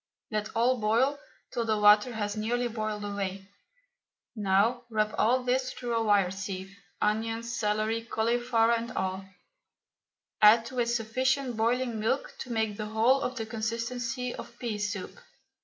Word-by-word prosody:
Let 215 0 -2
all 245 +2 +3
boil 240 +7 +2 0.3
till 235 - -1
the 220 -1 +1
water 210 +3 +6
has 205 -1 -2
nearly 240 +3 0
boiled 215 -2 -3
away. 195 -1 -4 0.9
Now 210 +4 +2
rub 215 -1 0
all 250 +3 +2
this 255 +1 0
through 240 -2 -3
a 230 - +2
wire 200 -4 +3
sieve, 190 0 -6 0.2
onions, 225 +2 -1
celery, 215 +1 0
cauliflower, 230 0 +1
and 235 +1 -1
all; 190 +1 -2 1.2
add 220 +2 +7
to 255 +1 -5
it 235 - +2
sufficient 245 +3 0
boiling 235 +1 0
milk 225 +6 -1
to 250 - -6
make 220 -3 -1
the 215 - -4
whole 230 +5 +3
of 255 - -2
the 225 -3 -3
consistency 230 +2 -3
of 235 - -9
pea 225 -4 -3
soup. 205 - -4
225 Hz, 150 wpm, -29 LUFS, 210-240 Hz, 1.2 s, add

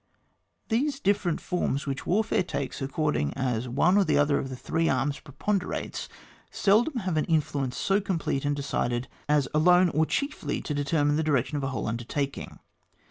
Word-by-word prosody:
These 275 +5 0
different 195 - +1
forms 145 -5 -1
which 135 -2 -4
warfare 210 +3 +2
takes 140 -7 -4
according 135 - -1
as 125 -2 -1
one 170 +10 +3
or 195 -6 +3
other 145 0 +3
of 135 - -4
the 130 - -5
three 165 +5 0
arms 140 +3 0
preponderates, 180 +7 -3 0.4
seldom 235 +6 +2
have 185 -4 -1
an 155 - +1
influence 145 -5 0
so 195 +1 +2
complete 165 -8 -1
and 145 0 0
decided 125 -3 -1 0.2
as 145 -2 +3
alone, 180 +4 +5
or 160 0 +1
chiefly 280 +1 -2
to 150 - -3
determine 145 +1 +1
the 160 - +1
direction 140 -2 +1
of 145 - -2
a - - 0
whole 130 - -3
undertaking. 120 +5 -3
150 Hz, 165 wpm, -27 LUFS, 135-180 Hz, 0.4 s, alone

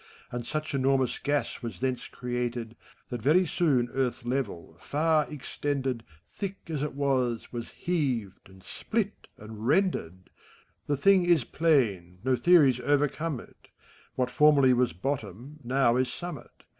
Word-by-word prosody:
And 120 -1 -5
such 155 +4 -3
enormous 135 -2 +1
gas 145 0 -1
was 115 -7 -6
thence 130 -2 -2
created. 120 -2 -4 0.3
That 120 -2 -4
very 160 +10 +4
soon 150 -8 +2
Earth's 130 -3 -1
level, 120 -11 -3
far 155 +6 +1
extended, 135 -4 -3 0.3
Thick 195 -1 -4
as 150 -3 -2
it 150 -2 -3
was, 130 -5 0
was 120 -1 -5
heaved, 130 - -2
and 95 0 -17
split, - - -3
and 110 +1 -8
rended 95 - +1
I - - -29 0.6
The 145 - +1
thing 190 +5 +5
is 170 -6 +4
plain, 110 - +1
no 130 0 +2
theories 140 -2 +5
overcome 145 +2 0
it: - - -19 0.5
What 125 -1 0
formerly 145 -3 +5
was 125 0 +2
bottom, 120 - -5
now 125 -1 +2
is 130 0 +2
sunmiit. 175 +7 -8
130 Hz, 145 wpm, -28 LUFS, 120-150 Hz, 0.6 s, thing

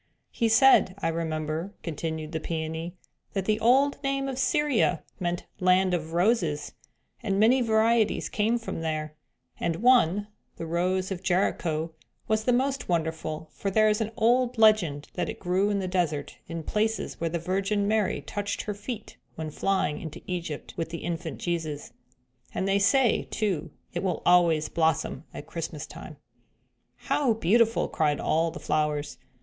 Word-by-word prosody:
"He 230 - +1
said, 225 -5 +6
I 200 - -1
remember," 160 +3 -3
continued 160 -1 -4
the 160 - -2
Peony, 160 +2 -4 0.4
"that 195 -2 -1
the 215 +1 +1
old 265 +5 +3
name 275 0 -1
of 265 -1 -4
Syria 265 - +2 0.2
meant 175 -1 -2
the 185 - -4
'land 185 0 +4
of 165 -2 -2
roses' 170 -6 +1 0.5
and 200 -4 0
many 245 +5 +5
varieties 220 -1 +2
came 220 +3 +1
from 230 -7 -5
there, 155 -1 -3 0.5
and 165 - 0
one, 205 -3 +4 0.3
the 165 - -5
'Rose 185 +3 0
of 185 -2 -3
Jericho,' 170 -3 0 0.4
was 220 0 +1
the 250 - +3
most 265 0 0
wonderful, 160 -2 -2
for 200 - -3
there 215 +2 +4
is 210 +1 +1
an 220 - -1
old 245 +1 +3
legend 205 -10 +4
that 175 -2 -2
it - - -6
grew 190 +3 +1
in 205 - +1
the 190 -2 -2
desert 175 -5 -1
in 165 0 -5
places 220 +5 -1
where 165 - 0
the 170 - -1
Virgin 195 +4 0
Mary 215 -2 +1
touched 205 0 -3
her 210 - -3
feet 210 +2 -7 0.2
when 160 -1 -5
flying 190 -2 0
into 160 -3 -8
Egypt 170 -5 -5
with 165 - -3
the 165 0 -6
infant 170 0 -4
Jesus; 160 -4 -3 0.6
and 190 - -1
they 195 +1 +3
say, 235 +3 +3
too, 200 -8 -1 0.2
it 175 - -2
will 185 -4 -2
always 170 -3 +4
blossom 160 -2 0
at - - -8
Christmas 160 -2 -5
time." 155 0 -10 0.8
"How 270 -6 +1
beautiful!" 225 +3 +3
cried 150 -3 0
all 165 +1 +1
the 165 - -8
flowers. 150 -1 -1
185 Hz, 165 wpm, -27 LUFS, 160-220 Hz, 0.8 s, said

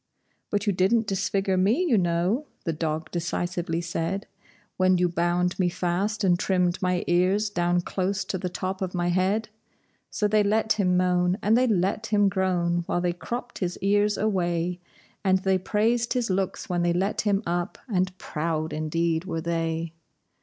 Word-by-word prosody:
"But 205 0 -1
you 205 - +2
didn't 205 +5 +2
disfigure 195 0 0
me, 215 - +2
you 255 - +3
know," 180 - +1 0.2
the 165 - -1
dog 160 0 -3
decisively 175 0 -2
said, 170 +3 -3 0.5
"When 185 0 +4
you 180 0 +3
bound 175 +1 0
me 180 -1 +3
fast 190 +5 -1
and 175 -2 +3
trimmed 180 -3 +1
my 180 -1 +1
ears 190 +4 +2
down 175 -1 +1
close 190 +2 -2
to 190 - -3
the 180 - -3
top 185 +1 -4
of 185 -1 -3
my 175 0 0
head!" 190 +5 +1 0.6
So 210 - 0
they 210 0 +3
let 215 +2 +2
him 180 -3 +2
moan 180 0 +2
and 215 +3 +4
they 255 +1 +3
let 205 +1 0
him 205 -2 +3
groan 180 -3 0
while - - 0
they 175 0 0
cropped 240 +7 -6
his 180 -2 -2
ears 205 +1 +2
away, 175 -4 0 0.4
And 190 -1 +4
they 190 -1 +2
praised 225 +5 +1
his 245 -5 0
looks 190 0 -2
when 175 -1 0
they 175 0 +2
let 190 +4 0
him 205 0 +1
up, 175 +2 -2
and 185 -4 -1
proud 155 -1 -3
indeed 160 +2 -1
were 165 -3 -3
they. 165 0 -2
185 Hz, 175 wpm, -26 LUFS, 175-200 Hz, 0.6 s, When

